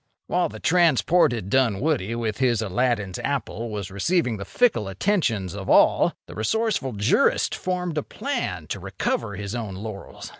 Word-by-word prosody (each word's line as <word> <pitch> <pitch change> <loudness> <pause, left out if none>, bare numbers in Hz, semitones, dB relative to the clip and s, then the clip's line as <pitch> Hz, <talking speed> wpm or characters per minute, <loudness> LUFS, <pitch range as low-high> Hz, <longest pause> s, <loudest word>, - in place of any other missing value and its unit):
While - - 0
the 110 - -9
transported 160 - +3
Dunwoody, 125 -2 +1
with 115 -1 -3
his 120 -4 +2
Aladdin's 105 -3 -1
apple, 120 -4 -3
was 100 -3 -5
receiving 120 - 0
the 100 - -6
fickle 210 - +2
attentions 110 - 0
of 100 -1 -6
all, - - +5
the - - -11
resourceful 140 - 0
jurist 105 +1 +2
formed 180 -3 -2
a - - -2
plan - - -4
to - - -3
recover 100 - -2
his 100 +2 -5
own 110 -6 -4
laurels. 100 0 -8
115 Hz, 150 wpm, -24 LUFS, 100-150 Hz, -, all